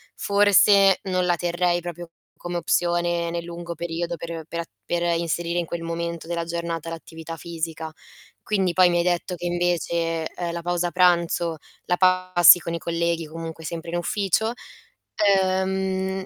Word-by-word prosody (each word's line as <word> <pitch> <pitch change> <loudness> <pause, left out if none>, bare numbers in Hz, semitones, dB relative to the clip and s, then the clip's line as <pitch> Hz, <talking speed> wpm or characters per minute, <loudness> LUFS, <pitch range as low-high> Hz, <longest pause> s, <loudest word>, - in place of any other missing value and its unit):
forse 200 -1 +5
non 185 -2 0
la 175 - +3
terrei 175 +1 0
proprio 175 0 -7 0.3
come 175 0 -5
opzione 175 0 0
nel 170 0 -3
lungo 170 0 -7
periodo 170 +1 -3
per 165 -1 -7
per 170 0 -3
a - - -7 0.2
per 175 0 -1 0.2
inserire 170 +1 -1
in 170 - -1
quel 170 -1 -5
momento 170 0 -4
della 170 -1 -2
giornata 170 -1 -4
l'attività 165 0 -8
fisica. 160 0 -5 0.5
Quindi 190 -4 0
poi 185 0 +5
mi 175 - +1
hai 170 - +2
detto 180 +1 -1
che 175 +1 -7
invece, 170 -2 0
ehm, 175 -1 -3
la 170 0 -5
pausa 175 0 0
pranzo 170 -2 +2 0.3
la 180 - +1
passi 185 -2 +6
con 170 -1 -5
i 170 - -2
colleghi, 170 -1 -1
comunque 165 0 -7
sempre 165 +1 -5
in 175 - -1
ufficio, 205 +4 0 0.6
ehm, 190 -1 +1
170 Hz, 160 wpm, -24 LUFS, 170-180 Hz, 0.6 s, passi